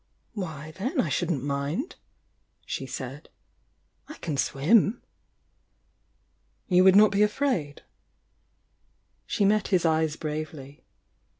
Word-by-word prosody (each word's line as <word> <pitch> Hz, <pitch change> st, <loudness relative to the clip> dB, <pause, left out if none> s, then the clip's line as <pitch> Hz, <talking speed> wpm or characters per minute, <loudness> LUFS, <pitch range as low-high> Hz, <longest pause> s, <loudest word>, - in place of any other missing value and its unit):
— -, -, -46 dB
Why, 160 Hz, -7 st, -6 dB
then 245 Hz, +8 st, -2 dB
I 155 Hz, -, +1 dB
shouldn't 155 Hz, -1 st, -1 dB
mind!" 145 Hz, -, -3 dB, 0.7 s
she -, -, -4 dB
said. -, -, -7 dB, 0.8 s
"I 305 Hz, -, -9 dB
can 155 Hz, -4 st, -4 dB
swim." 195 Hz, -, +2 dB, 1.6 s
"You 180 Hz, -2 st, +4 dB
would 190 Hz, 0 st, +7 dB
not 210 Hz, +1 st, +7 dB
be 200 Hz, 0 st, +1 dB
afraid?" 210 Hz, -, 0 dB, 1.4 s
She 205 Hz, -, +1 dB
met 210 Hz, 0 st, +2 dB
his 180 Hz, -3 st, +1 dB
eyes 160 Hz, -1 st, +1 dB
bravely. 150 Hz, -3 st, -6 dB
170 Hz, 110 wpm, -26 LUFS, 150-205 Hz, 1.6 s, would